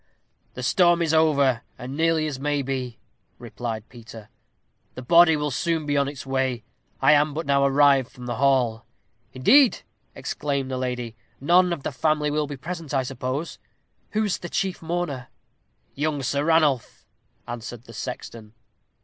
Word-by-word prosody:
"The 125 - -6
storm 175 +5 +3
is 160 -1 0
over, 140 -6 +3 0.2
as 125 - -8
nearly 160 +3 +1
as 145 -4 -4
maybe," 135 -4 -2 0.4
replied 115 -3 -6
Peter. 115 -3 -12 0.7
"The 130 - -7
body 170 +3 +6
will 150 -1 -2
soon 160 +3 -1
be 145 0 -1
on 140 -1 +2
its 140 -1 -7
way. 130 -3 -1 0.4
I - - +6
am 150 0 +3
but 160 +1 -3
now 140 0 +2
arrived 140 -2 +4
from 125 - -11
the 120 -2 -4
hall." 125 -4 +2 0.5
"Indeed!" 240 - +4 0.3
exclaimed 140 -2 -3
the 130 - -2
lady. 125 -3 -4 0.2
"None 175 +5 +4
of 160 -5 -3
the - - -2
family 150 +2 0
will 150 0 0
be 145 -1 -7
present, 165 -1 -6
I 135 - +2
suppose. 130 +4 -4 0.5
Who 215 +1 +1
is 205 -4 -1
the 175 - -7
chief 195 -4 -2
mourner?" 165 -6 -3 0.7
"Young 145 -1 -2
Sir 140 +3 -1
Ranulph," 155 -6 +1 0.4
answered 120 0 -7
the 115 - -14
sexton. 115 -2 -7
140 Hz, 160 wpm, -24 LUFS, 125-160 Hz, 0.7 s, body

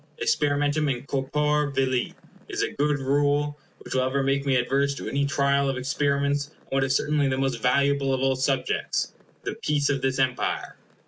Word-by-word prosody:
Experimentum 145 - +1
in 130 0 -3
corpore 150 +2 0
vili 130 -2 0 0.3
is - - -1
a - - -1
good 145 0 +1
rule, 145 +2 +1 0.2
which - - -8
will 130 - +2
ever 130 +1 0
make 140 +1 0
me 135 - +3
adverse 140 +3 +1
to - - -6
any 140 0 0
trial 140 0 +2
of 135 - -2
experiments 140 +1 0
on - - -28
what 135 0 +1
is 130 0 +1
certainly 145 -1 +1
the 130 -1 0
most 135 -4 -1
valuable 140 +2 +2
of 130 - +1
all 135 0 +2
subjects, 135 +1 -1 0.3
the - - -3
peace 145 -1 +1
of 135 -2 -1
this 130 0 0
Empire. 130 -2 -1
140 Hz, 185 wpm, -25 LUFS, 135-145 Hz, 0.3 s, me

